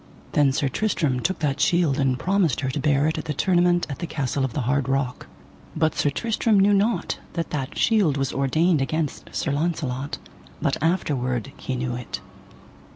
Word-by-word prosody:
Then 145 -2 +4
Sir 140 +1 0
Tristram 150 - 0
took 185 +7 -1
that 145 -2 0
shield 155 -3 +2
and 130 -2 +2
promised 180 -4 +1
her 130 -1 -1
to 145 - -3
bear 145 0 +2
it 160 0 0
at - - -6
the 150 - -3
tournament 175 +1 +3
at 140 - -6
the 170 - -3
Castle 140 -3 -1
of 130 -4 -2
the 145 - -1
Hard 130 +2 0
Rock. 135 -2 -1 0.5
But 160 0 +2
Sir 145 - +1
Tristram 220 +5 +1
knew 200 +1 +5
not 210 +4 +1
that 165 -1 -3
that 135 -3 -3
shield 200 - +3
was 135 -1 -1
ordained 155 +4 +2
against 155 +2 -2
Sir 150 - -1
Launcelot, 145 -3 -2 0.4
but - - -1
afterward 140 - 0
he 130 - -4
knew 125 0 -2
it. 125 0 -5
145 Hz, 185 wpm, -24 LUFS, 135-175 Hz, 0.5 s, knew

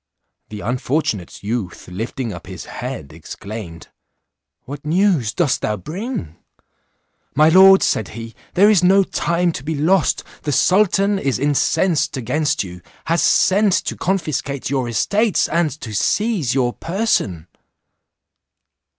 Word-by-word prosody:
The 105 -1 -7
unfortunate 125 - -2
youth 105 -4 -4
lifting 115 +5 -5
up - - -10
his - - -8
head, 70 - -7
exclaimed, 85 +1 -9 0.8
"What 140 +2 -8
news 160 - +1
dost 145 -4 0
thou 105 0 -1
bring?" 155 - -6 1.0
"My 155 +2 +5
lord," 190 +3 +7
said 110 - 0
he, 115 0 -8 0.2
"there 200 +3 +6
is 205 -5 +4
no 195 +2 +5
time 175 -1 0
to 135 - -7
be 160 +2 -3
lost; 165 +4 +2 0.2
the 145 - -2
sultan 200 +5 +3
is 135 -6 -1
incensed 145 +2 +1
against 150 +4 0
you, 90 -2 -10 0.2
has 165 +1 +1
sent 200 +1 +3
to - - -1
confiscate 150 -8 -2
your 130 -3 -1
estates, 200 - +1
and 165 0 +1
to 110 - -7
seize 185 - 0
your 125 -2 +1
person." 165 - -1
150 Hz, 130 wpm, -19 LUFS, 115-185 Hz, 1.0 s, lord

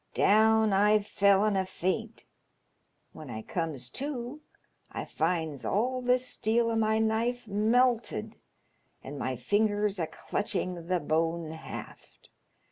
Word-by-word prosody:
Down 220 0 +4
I 210 +2 +5
fell 200 -1 +3
in 210 -2 +1
a 190 - +2
faint. 190 +4 -3 0.9
When 155 -4 -10
I 110 -2 -6
comes 155 -7 -3
to 275 - -5 0.5
I - - -5
finds 160 -4 -2
all 250 +5 0
the 250 0 +3
steel 235 -2 0
o' - - -1
my 220 0 +2
knife 225 +2 0
melted, 225 - +1 0.7
and 140 +1 -7
my 130 0 -2
fingers 205 - +1
a 165 - -1
clutching 180 -4 -3
the 180 0 +1
bone 165 +1 -1
haft. 160 - -10
205 Hz, 125 wpm, -29 LUFS, 165-225 Hz, 0.9 s, I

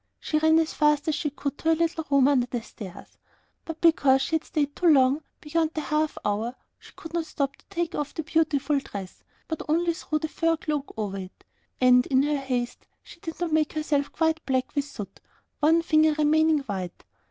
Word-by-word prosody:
She 305 - 0
ran 315 +1 +4
as 325 -1 +1
fast 300 0 +2
as - - +1
she 295 - -1
could 285 0 -5
to 325 - 0
her 325 - +5
little 330 0 0
room 275 -2 +5
under 260 -4 +3
the 240 -2 -4
stairs, 195 -5 -11 0.5
but 325 -1 -6
because 275 -5 +4
she - - -4
had 320 - -11
stayed 290 -2 -2
too 360 - +1
long 275 -1 +5 0.2
beyond 320 +1 -1
the 310 - -1
half 305 0 -1
hour, 215 +4 -1 0.2
she - - -16
could 325 0 -10
not 335 -1 -1
stop 275 -2 -2
to - - -26
take 340 -1 -2
off 295 -1 -4
the 320 - -3
beautiful 295 -2 +1
dress, 195 -8 -9 0.2
but 320 - -4
only 335 +2 +2
threw 325 -2 -2
the 315 - -3
fur 330 +1 0
cloak 300 -2 -3
over 200 -2 -3
it, 185 0 -10 0.4
and 250 -1 +5
in 265 0 +3
her 295 0 +1
haste 250 -3 -3 0.2
she - - -14
did 325 -1 -7
not 345 -3 -2
make 310 -1 +2
herself 295 -2 0
quite 320 0 0
black 260 -1 0
with 285 0 0
the - - -13
soot, 205 -3 -8 0.4
one 325 +3 +4
finger 310 -1 +4
remaining 310 0 +3
white. 190 -8 -6
300 Hz, 210 wpm, -26 LUFS, 270-320 Hz, 0.5 s, her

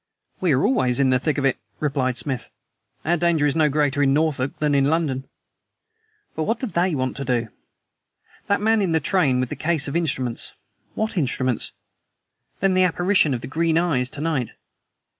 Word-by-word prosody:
"We 180 -3 +1
are 130 - +2
always 125 - +2
in 135 -1 +3
the 130 - +3
thick 150 +2 -1
of 140 - 0
it," 135 - +1 0.2
replied 135 -4 0
Smith. 130 -5 -1 0.6
"Our 170 +3 +2
danger 170 -3 +2
is 145 - +1
no 155 -2 +3
greater 145 -1 +1
in 135 -1 +3
Norfolk 145 -4 0
than 150 -1 0
in 140 0 +3
London. 145 -5 0 1.1
But 160 - -1
what 225 +1 -1
do - - -2
they 180 -6 0
want 130 -1 -2
to 140 - -3
do? 120 -3 -1 1.0
That 200 0 +1
man 220 0 +3
in 180 -4 0
the 160 - +3
train 145 -5 +2
with 130 -1 -1
the - - -4
case 160 -3 0
of 140 - -4
instruments 130 -8 -2 0.4
WHAT 220 -2 -2
instruments? 130 -5 0 0.9
Then 195 0 +3
the 185 - +3
apparition 175 -4 +2
of 120 - -5
the - - -7
green 160 +3 +1
eyes 145 -8 +1
to 145 - -7
night. 150 -8 -1
150 Hz, 190 wpm, -22 LUFS, 130-170 Hz, 1.1 s, in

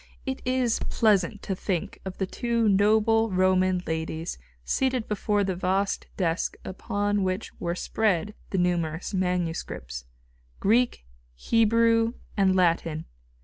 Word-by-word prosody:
It 265 -1 -3
is 255 -2 +1
pleasant 205 -2 +2
to 195 - -2
think 180 -2 -3
of 190 -1 -6
the 190 - 0
two 235 +3 0
noble 220 +3 +4
Roman 185 -1 +2
ladies 160 - -3 0.3
seated 260 -3 0
before 210 0 0
the 190 -1 -1
vast 190 +2 0
desk 170 -2 -1
upon 205 +2 -1
which 185 +2 -2
were 170 0 -2
spread 210 0 0 0.2
the 195 - -2
numerous 175 -1 0
manuscripts, 170 - -2 0.5
Greek, 235 - +2 0.3
Hebrew 230 - +3 0.2
and 190 -2 +3
Latin... 165 -3 +1
190 Hz, 120 wpm, -26 LUFS, 180-220 Hz, 0.5 s, noble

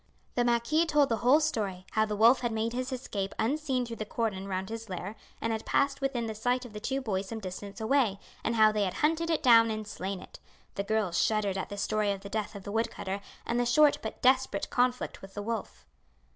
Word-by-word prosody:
The 245 - +2
marquis 240 +8 +2
told 295 -3 +3
the 230 - +1
whole 250 +7 +5
story, 205 -12 -2
how 215 0 +2
the 210 -1 -3
wolf 230 +5 +6
had 240 -2 -1
made 225 +1 -1
his 255 +1 -3
escape 205 -6 -4
unseen 265 +1 0
through 230 -1 -7
the - - -3
cordon 210 -3 -2
round 190 0 -3
his 225 -1 -6
lair, 185 +3 -5 0.2
and 225 0 -1
had 220 - -3
passed 280 0 +1
within 265 -4 -1
the 220 - -3
sight 245 +4 0
of 235 - -11
the 210 - -6
two 270 +5 -2
boys 200 -5 -2
some 225 - -5
distance 200 +2 -7
away, 225 -3 +2 0.3
and 230 - 0
how 215 -1 +6
they 210 -1 +1
had 185 - -3
hunted 325 +2 +1
it 325 - 0
down 230 -3 +7
and 215 -1 -4
slain 195 -1 -4
it. - - -13 0.3
The 200 - -2
girls 200 -4 +1
shuddered 210 -3 +1
at 190 - -3
the 205 - -6
story 210 0 +1
of 195 -1 -4
the 200 - -8
death 215 0 -3
of 200 - -8
the 200 - -6
wood 225 +2 +1
cutter 195 -1 -5 0.2
and 235 +1 0
the 245 - +2
short 295 +4 +5
but 220 - -7
desperate 260 +1 +2
conflict 250 0 0
with 195 0 -12
the 205 - -4
wolf. 225 -1 -5
225 Hz, 240 wpm, -29 LUFS, 205-250 Hz, 0.3 s, down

